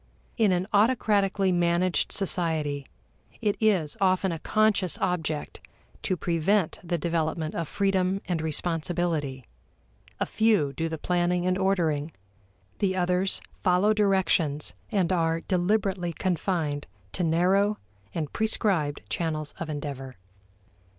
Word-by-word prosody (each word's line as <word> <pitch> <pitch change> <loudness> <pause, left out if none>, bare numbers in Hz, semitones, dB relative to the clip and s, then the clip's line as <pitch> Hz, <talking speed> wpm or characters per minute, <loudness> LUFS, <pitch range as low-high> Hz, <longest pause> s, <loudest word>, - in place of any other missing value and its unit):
In 220 -5 +3
an 180 0 +1
autocratically 205 -3 +3
managed 175 0 +1
society, 160 -7 -1 0.5
it 210 -3 +1
is 190 -9 +2
often 185 0 +2
a 165 - -4
conscious 215 -2 +2
object 160 -4 -2 0.4
to 185 - -1
prevent 175 +2 +1
the 175 0 -1
development 160 -1 -1
of 165 -2 -3
freedom 195 0 +1
and 175 -3 -1
responsibility, 160 -4 -2 0.7
a - - +1
few 210 -11 +2
do 165 +4 -2
the 160 - -4
planning 175 +1 0
and 185 0 +2
ordering, 170 -6 +1 0.7
the 190 -2 +1
others 180 +1 +1
follow 185 +4 +2
directions 190 -8 +1 0.2
and 190 -4 +1
are 165 -1 +1
deliberately 185 -1 0
confined 165 -4 -1 0.2
to 180 - -1
narrow 185 +6 +2 0.3
and 155 -3 -4
prescribed 190 -9 +1
channels 155 +4 -2
of 165 - -4
endeavor. 140 -3 -5
175 Hz, 115 wpm, -27 LUFS, 160-195 Hz, 0.7 s, In